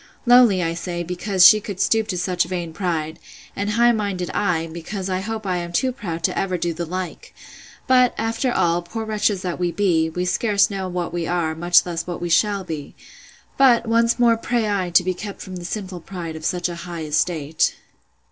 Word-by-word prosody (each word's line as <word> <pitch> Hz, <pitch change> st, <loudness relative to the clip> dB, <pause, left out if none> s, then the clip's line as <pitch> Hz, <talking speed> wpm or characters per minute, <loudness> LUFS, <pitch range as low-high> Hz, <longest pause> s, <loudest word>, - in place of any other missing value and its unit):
Lowly, 240 Hz, -7 st, +6 dB
I 165 Hz, 0 st, -1 dB
say, 175 Hz, 0 st, -4 dB
because 180 Hz, +2 st, +2 dB
she 215 Hz, +1 st, +6 dB
could 200 Hz, -2 st, -7 dB
stoop 220 Hz, +1 st, +2 dB
to 185 Hz, -, -3 dB
such 180 Hz, 0 st, 0 dB
vain 175 Hz, -3 st, -4 dB
pride; 165 Hz, -3 st, -3 dB, 0.4 s
and 200 Hz, +1 st, -2 dB
high 235 Hz, +3 st, +4 dB
minded 200 Hz, -5 st, -2 dB
I, 175 Hz, -5 st, 0 dB
because 180 Hz, +4 st, -6 dB
I 185 Hz, -, 0 dB
hope 220 Hz, +2 st, -5 dB
I 185 Hz, -2 st, 0 dB
am 175 Hz, 0 st, -5 dB
too 255 Hz, +9 st, +1 dB
proud 170 Hz, -10 st, -3 dB
ever 185 Hz, -2 st, -2 dB
to 170 Hz, 0 st, -1 dB
do -, -, -2 dB
the 170 Hz, +1 st, -5 dB
like!—But, 210 Hz, +7 st, -2 dB
after 230 Hz, +3 st, -1 dB
all, 170 Hz, -5 st, +1 dB
poor 220 Hz, +6 st, -6 dB
wretches 210 Hz, -3 st, 0 dB
that 180 Hz, -1 st, -3 dB
we 175 Hz, -1 st, 0 dB
be! 170 Hz, -5 st, +1 dB
we 180 Hz, +3 st, -3 dB
scarce 200 Hz, +3 st, +2 dB
know 190 Hz, -2 st, -3 dB
what 175 Hz, -1 st, -3 dB
we 170 Hz, -1 st, -2 dB
are, 170 Hz, -2 st, 0 dB
much 175 Hz, +2 st, +3 dB
less 170 Hz, -1 st, -4 dB
what 175 Hz, -, -4 dB
we 175 Hz, -, -4 dB
shall 200 Hz, +2 st, +2 dB
be!—But, 230 Hz, -, -1 dB
once 230 Hz, +1 st, +2 dB
more 235 Hz, -2 st, +4 dB
pray 235 Hz, -1 st, -1 dB
I 195 Hz, -3 st, -1 dB
to 175 Hz, +1 st, +4 dB
be 185 Hz, +1 st, -1 dB
kept 200 Hz, +2 st, -8 dB
from 185 Hz, -1 st, -7 dB
the 175 Hz, -, -8 dB
sinful 185 Hz, -1 st, -5 dB
pride 170 Hz, -2 st, -7 dB
of 160 Hz, +2 st, -1 dB
a 175 Hz, -1 st, -2 dB
high 170 Hz, -1 st, -6 dB
estate. 155 Hz, 0 st, 0 dB
180 Hz, 200 wpm, -21 LUFS, 170-210 Hz, 0.4 s, Lowly